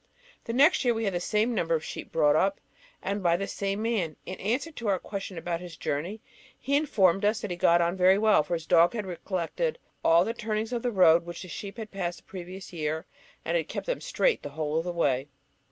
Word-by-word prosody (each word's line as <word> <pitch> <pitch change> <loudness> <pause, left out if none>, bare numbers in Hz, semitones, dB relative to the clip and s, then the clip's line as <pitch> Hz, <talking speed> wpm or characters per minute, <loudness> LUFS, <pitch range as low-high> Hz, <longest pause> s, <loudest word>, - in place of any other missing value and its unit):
The 230 - -3
next 285 +7 +5
year 240 -2 +2
we 225 - -2
had 200 -3 0
the 175 - 0
same 215 +6 +1
number 165 -6 +1
of 160 - -3
sheep - - -7
brought 150 -2 +4
up, 195 +5 +2 0.4
and 200 +1 -2
by 170 -2 +3
the 195 - -2
same 200 +1 -3
man. 200 -10 -1
In - - -5
answer 255 - -1
to 235 -7 -6
our 195 -2 +3
question 195 -1 -6
about 170 +1 -3
his 175 -2 -9
journey, 175 +10 -3 0.4
he 280 - -1
informed 195 - +3
us 215 +3 +2
that 210 - -4
he - - -1
had 175 - -19
got 170 -1 +5
on 170 +1 +1
very 185 +1 +5
well, 215 -4 +5
for 170 - -2
his 165 -1 -6
dog 170 +3 +5
had 215 -3 -3
recollected 185 - -2 0.3
all 170 +2 +5
the 225 - -2
turnings 220 0 -3
of 240 - -1
the 245 - 0
road 170 -6 +5
which 175 +1 -7
the - - -9
sheep 200 +7 -7
had 220 -2 -7
passed 175 -3 -3
the - - -17
previous 185 0 -9
year, 160 0 -2 0.4
and - - 0
had - - 0
kept - - -5
them - - -2
straight - - +1
the - - -6
whole 155 +1 -1
of 165 - -4
the 180 - -2
way. 140 -6 0
190 Hz, 245 wpm, -28 LUFS, 170-220 Hz, 0.4 s, next